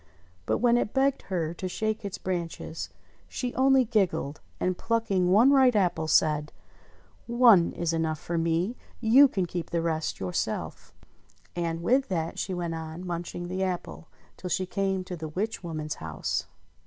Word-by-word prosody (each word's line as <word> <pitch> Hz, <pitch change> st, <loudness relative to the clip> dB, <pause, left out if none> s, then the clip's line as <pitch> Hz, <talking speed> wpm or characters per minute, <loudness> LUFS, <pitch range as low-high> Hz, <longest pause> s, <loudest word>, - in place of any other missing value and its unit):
But -, -, +2 dB
when 240 Hz, -1 st, +4 dB
it 240 Hz, -, -2 dB
begged 270 Hz, 0 st, +2 dB
her 170 Hz, -4 st, -1 dB
to 185 Hz, +2 st, -5 dB
shake 215 Hz, +4 st, -2 dB
its 200 Hz, -2 st, -4 dB
branches, 170 Hz, -3 st, -4 dB, 0.4 s
she 250 Hz, -1 st, -3 dB
only 265 Hz, 0 st, +4 dB
giggled, 195 Hz, -, 0 dB, 0.2 s
and 185 Hz, 0 st, 0 dB
plucking 200 Hz, -5 st, 0 dB
one 225 Hz, +9 st, +6 dB
ripe 260 Hz, -4 st, +5 dB
apple, 175 Hz, -5 st, +1 dB
said: 150 Hz, -1 st, +2 dB, 0.8 s
"One 235 Hz, -7 st, +6 dB
is 170 Hz, -1 st, -1 dB
enough 160 Hz, -1 st, 0 dB
for 170 Hz, -, -4 dB
me: 170 Hz, +7 st, 0 dB, 0.2 s
you 245 Hz, +5 st, +7 dB
can 190 Hz, -8 st, -1 dB
keep 175 Hz, -1 st, -5 dB
the 170 Hz, -, 0 dB
rest 165 Hz, -1 st, -2 dB
yourself." 90 Hz, -2 st, -3 dB, 0.6 s
And 170 Hz, -1 st, -2 dB
with 260 Hz, +7 st, +3 dB
that 165 Hz, -4 st, -2 dB
she 190 Hz, -, -2 dB
went 175 Hz, -2 st, -2 dB
on 160 Hz, +2 st, -6 dB
munching 175 Hz, 0 st, -4 dB
the 185 Hz, +2 st, -3 dB
apple, 180 Hz, -3 st, -3 dB, 0.3 s
till 180 Hz, -, -6 dB
she 185 Hz, +1 st, 0 dB
came 190 Hz, 0 st, -1 dB
to 185 Hz, -1 st, -6 dB
the 160 Hz, -2 st, -6 dB
witch 200 Hz, +6 st, -3 dB
woman's 155 Hz, -3 st, -4 dB
house. 80 Hz, -1 st, -3 dB
180 Hz, 165 wpm, -27 LUFS, 165-220 Hz, 0.8 s, you